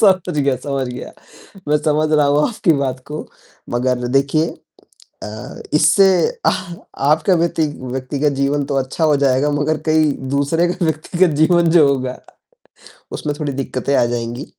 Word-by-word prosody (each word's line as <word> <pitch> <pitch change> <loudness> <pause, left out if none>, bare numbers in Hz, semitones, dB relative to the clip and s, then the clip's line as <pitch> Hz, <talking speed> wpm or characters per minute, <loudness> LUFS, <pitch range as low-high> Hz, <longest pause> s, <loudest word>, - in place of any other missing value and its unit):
समझ 185 -6 +3
गया, 140 -2 +1
समझ 135 0 -3
गया 125 0 -8 0.6
मैं 150 - +4
समझ 155 +1 0
रहा 150 -2 +4
हूँ 145 +1 +2
आपकी 210 -7 +1
बात 135 -3 -2
को। 150 +1 -6 0.5
मगर 125 0 -1
देखिए 155 +4 +1 0.8
अ, 105 0 -8
इससे 155 +6 +5 0.4
आ - - +5 0.6
आपका 155 +5 +3
व्यती 165 -2 +1 0.2
व्यक्तिगत 135 +3 -1
जीवन 140 +1 +1
तो 140 - -3
अच्छा 135 +4 -2
हो 150 -2 +4
जाएगा 140 +1 +2
मगर 150 +2 0
कई 155 -1 +3 0.2
दूसरे 165 +5 +1
का 180 -2 -2
व्यक्तिगत 160 +2 +1
जीवन 170 +1 +4
जो 150 -4 +6
होगा 130 -2 -1 1.0
उसमें 145 -1 -3
थोड़ी 145 -2 -2
दिक़्क़तें 135 0 -3
आ - - +4
जाएँगी। 120 +2 -4
145 Hz, 150 wpm, -18 LUFS, 135-155 Hz, 1.0 s, जो